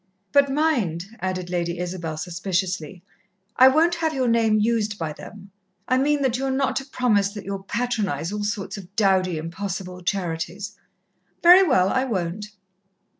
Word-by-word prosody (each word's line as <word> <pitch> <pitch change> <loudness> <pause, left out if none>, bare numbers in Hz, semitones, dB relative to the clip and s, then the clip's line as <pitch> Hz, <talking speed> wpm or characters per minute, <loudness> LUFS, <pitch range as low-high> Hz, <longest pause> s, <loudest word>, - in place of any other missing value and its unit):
"But 280 -1 +4
mind," 245 - 0
added 185 -1 -3
Lady 170 -1 -1
Isabel 175 -3 -4
suspiciously, 180 0 -3 0.5
"I 260 - +8
won't 320 +6 +4
have 325 -2 -1
your 260 -2 +1
name 225 -2 +3
used 215 -1 0
by 160 -4 -3
them. 200 +4 -12 0.4
I 255 - +2
mean 290 +1 +1
that 255 -1 +1
you 270 - -2
are - - 0
not 265 +1 0
to 270 - -3
promise 215 -7 +1
that 205 -2 -8
you'll 195 0 -4
patronize 200 - -2
all 210 0 -3
sorts 205 -1 -3
of 195 0 -12
dowdy, 190 -5 +2
impossible 180 +2 -5
charities." 180 +2 -3 0.7
"Very 355 +2 +9
well, 195 - +3
I 260 +4 +1
won't." 200 -3 -3
200 Hz, 160 wpm, -23 LUFS, 180-255 Hz, 0.7 s, Very